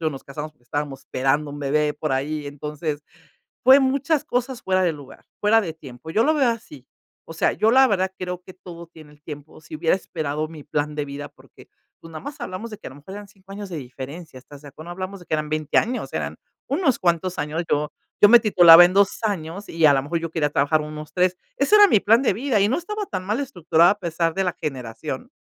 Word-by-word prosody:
nos 135 - -9
casamos 150 +2 -7
porque 120 -5 -35
estábamos 140 +1 -4
esperando 135 +3 -1
un 145 - -8
bebé 150 +1 0
por 155 0 -4
ahí, 145 +2 -2
entonces, 150 +1 -5 0.6
fue 265 +2 +8
muchas 275 +3 +1
cosas 250 0 -2
fuera 185 0 +1
de 175 -3 +2
lugar, 145 -3 -13 0.2
fuera 220 +2 +4
de 165 -4 -4
tiempo, 135 0 -11
yo 220 +6 +2
lo 310 - +3
veo 270 -5 +3
así. 150 - -8 0.4
O - - -7
sea, 160 - +1
yo 215 +2 +2
la 265 +1 +7
verdad 190 -3 0
creo 180 0 -5
que 185 - -13
todo 170 -2 -11
tiene 155 -3 -16
el 150 0 -23
tiempo, 150 0 -10
si 160 - -11
hubiera 165 +3 +2
esperado 155 -4 -4
mi 155 -3 -11
plan 150 0 -2
de 150 -1 -2
vida, 140 +1 -7
porque - - -19 0.3
pues, 165 - -13
nada 155 - -7
más 285 0 -7
hablamos 200 +5 -6
de 215 - -7
que - - -11
a - - -15
lo 130 - -13
mejor 150 +7 -11
eran 205 0 -8
5 195 -1 -16
años 205 0 -7
de 170 - -5
diferencia, 135 +4 -9
estás 140 +2 -14
de 145 - -11
acu 155 +3 -12
no 175 - -9
hablamos 185 +2 -6
de 175 - -15
que - - -1
eran 155 -1 -2
20 155 -1 0
años, 250 +3 -2
eran - - -4 0.3
unos 280 -3 +1
cuantos 175 +1 0
años, 155 +3 -2
yo 150 0 0 0.3
yo 205 - +9
me 240 - +9
titulaba 175 -5 +8
en 185 - -4
2 200 0 +3
años 195 -1 -3
y, 165 -1 -2
a 145 - +7
la 135 - +2
mejor, 155 +5 -2
yo 165 -1 -5
quería 155 -3 0
trabajar 150 +2 +2
unos 150 0 -8
3 180 +1 +1 0.2
ese 285 +10 +4
era 415 -1 +9
mi 215 - +4
plan 225 +6 +4
de 250 - +2
vida 235 -1 0
y 200 - +4
no 260 - 0
estaba 420 +4 -4
tan 185 -2 -5
mal 215 +6 -1
estructurada 175 - +3
a 205 - -8
pesar 165 -2 -1
de 195 - 0
la 180 - -1
generación. 125 -6 -6
165 Hz, 245 wpm, -22 LUFS, 150-205 Hz, 0.6 s, yo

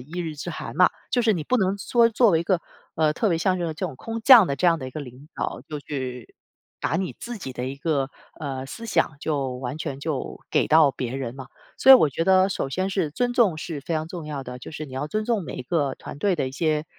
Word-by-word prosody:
一 155 +8 -8
日 160 -3 -4
之 160 +4 -5
寒 155 - -7
嘛。 180 +1 +6 0.2
就 245 - +2
是 225 -1 +4
你 165 -6 -3
不 255 - +2
能 195 -2 +1
说 235 +3 +3
作 230 -1 +4
为 165 -1 +3
一 - - -1
个， 185 -1 +1 0.4
呃， 155 -1 +3
特 215 +6 0
别 165 - +1
像 185 +2 +1
这 175 - -2
种 165 - -2
这 - - -2
种 - - -7
空 225 - -5
降 235 -6 +9
的 140 - -1
这 180 - +1
样 165 -1 +4
的 130 - -5
一 - - -11
个 155 - -6
领 135 +2 -11
导， - - -3
就 150 -1 -4
去 130 -4 -6 0.5
把 160 - 0
你 185 0 -2
自 240 -1 -6
己 135 -9 -6
的 125 0 -4
一 135 +1 -5
个， 140 -2 -1 0.3
呃， 135 -3 -4
思 230 +12 -8
想 165 -7 +1
就 140 -4 -1
完 130 +4 -5
全 140 -4 -5
就 145 -2 -4
给 - - +2
到 155 -2 +6
别 125 -1 -4
人 130 -2 -4
嘛。 130 -2 -8 0.3
所 265 - +6
以 - - +13
我 200 - +5
觉 165 +5 -1
得 190 0 +5
首 135 - -2
先 185 +7 -1
是 180 -6 0
尊 245 +10 -1
重 220 -10 +3
是 155 -2 -5
非 160 +4 -3
常 155 0 -1
重 170 -3 -7
要 145 -3 -5
的， 125 0 -7
就 - - -9
是 155 0 -6
你 135 - -12
要 135 +3 -2
尊 215 +5 -1
重 225 -4 0
每 130 -2 -6
个 140 -1 0
团 - - -9
队 195 +1 +1
的 135 - -1
一 130 - -10
些， 155 +1 0
155 Hz, 295 characters per minute, -24 LUFS, 135-190 Hz, 0.5 s, 以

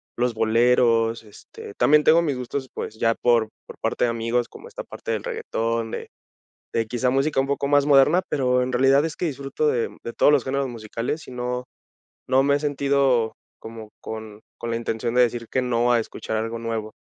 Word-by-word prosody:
los 120 0 0
boleros, 115 0 +2
este, 105 -1 -12
también 150 +5 +4
tengo 165 +2 +6
mis 145 -6 -1
gustos, 130 +2 -4
pues, 110 - -6
ya 115 +1 +2
por 115 -2 +2 0.2
por - - -12
parte - - 0
de - - +1
amigos, 115 +1 -1
como 470 - -13
esta - - -8
parte - - -6
del - - -2
reguetón, 115 - -2
de - - -5 0.7
de 115 -1 +1
quizá 125 +2 0
música 135 +2 +1
un 135 - +2
poco 140 0 -1
más 145 0 +3
moderna, 145 +5 +5
pero, 125 -2 +1
en 125 - -3
realidad 135 +3 +4
es 160 - -4
que - - -3
disfruto 140 +1 -2
de 120 -5 0
de 115 - -5
todos - - +4
los 145 -4 +3
géneros 135 +1 -1
musicales, 115 +5 -5
y - - -9
no 125 0 -3 0.6
no 130 +1 +4
me 140 +1 +3
he - - -7
sentido 140 -5 +1 0.2
como 110 -1 -10
con 110 -1 -8 0.2
con 120 - -5
la 115 - -1
intención 115 +1 -2
de 125 - +6
decir 120 -1 0
que 130 - 0
no 120 -1 +1
a 120 - +4
escuchar 110 0 -4
algo 115 +1 -3
nuevo. 115 -2 -4
125 Hz, 205 wpm, -23 LUFS, 115-140 Hz, 0.7 s, tengo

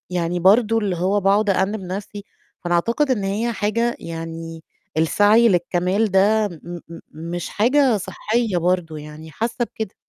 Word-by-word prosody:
يعني 175 0 -1
برضو 220 +4 +4
اللي 195 -5 -1
هو 190 +4 +1
باقعد 200 +2 +2
أأنِب 195 +2 0
نَفْسي، 200 +2 -6 0.4
فأنا 175 0 0
أعتقد 235 - +1
إن 205 -6 0
هي 220 +5 -1
حاجة 230 +3 -1
يعني 165 0 -7 0.3
السعي 210 +8 +4
للكمال 180 +3 +1
ده 205 +3 +3
م 175 0 -9
م 165 0 -10 0.3
مش 175 - -4
حاجة 250 +2 +3
صحّية 220 +1 -2
برضو 170 -2 -1
يعني 150 +1 -10
حاسة 235 +5 -2
كده. 220 -5 -5
195 Hz, 150 wpm, -21 LUFS, 175-220 Hz, 0.4 s, برضو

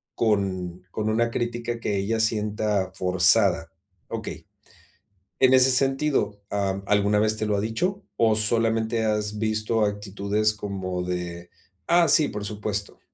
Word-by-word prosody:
con 95 -5 -1
con 110 0 -2
una 115 +2 +1
crítica 120 0 -3
que 105 -3 -2
ella 110 +4 -1
sienta 105 -3 0
forzada. 90 -1 +3 0.4
Okey, - - -6 1.0
en 130 0 +5
ese 130 0 +6
sentido, 135 -6 +1
¿ah, 100 -1 -2
alguna 105 0 +2
vez 110 0 +1
te 110 - -2
lo 105 -1 0
ha - - 0
dicho, 180 - -2
o 110 -1 +3
solamente 115 +1 +1
has 105 -1 -1
visto 110 0 0
actitudes 105 +1 -1
como 95 -3 -4
de: 90 -1 -5 0.4
"Ah, 170 -1 +4
sí, 150 0 +5
por 105 -1 -6
supuesto"? 105 -1 -3
105 Hz, 135 wpm, -24 LUFS, 100-115 Hz, 1.0 s, ese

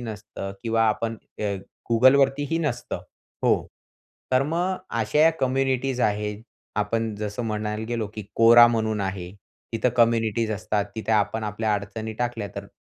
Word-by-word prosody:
नसतं 105 -3 -6
किंवा 115 -1 +1
आपण 115 +1 -1 0.2
अ, - - -4 0.5
Googleवरतीही 135 +6 +4
नसतं 150 -7 -2 0.5
हो, - - +6 0.8
तर 130 +1 +5
मग 175 +6 -1 0.2
अश्या 150 +9 +4
कम्युनिटीज 130 0 0
आहेत 105 -1 0 0.3
आपण 110 +1 0
जसं 105 +2 -4
म्हणायला 105 -1 -2
गेलो, 115 -3 -1
की 105 - -5 0.2
Quora 120 +1 +9
म्हणून 110 -2 0
आहे 95 -2 -3 0.4
तिथं 115 +2 +1
कम्युनिटीज 115 -1 +2
असतात. 105 -1 -1
तिथे 110 0 -2
आपण 110 +1 +1
आपल्या 105 +1 -1
अडचणी 110 +2 -4
टाकल्या 120 -4 -2
तर, 100 - -5
115 Hz, 135 wpm, -25 LUFS, 105-125 Hz, 0.8 s, Quora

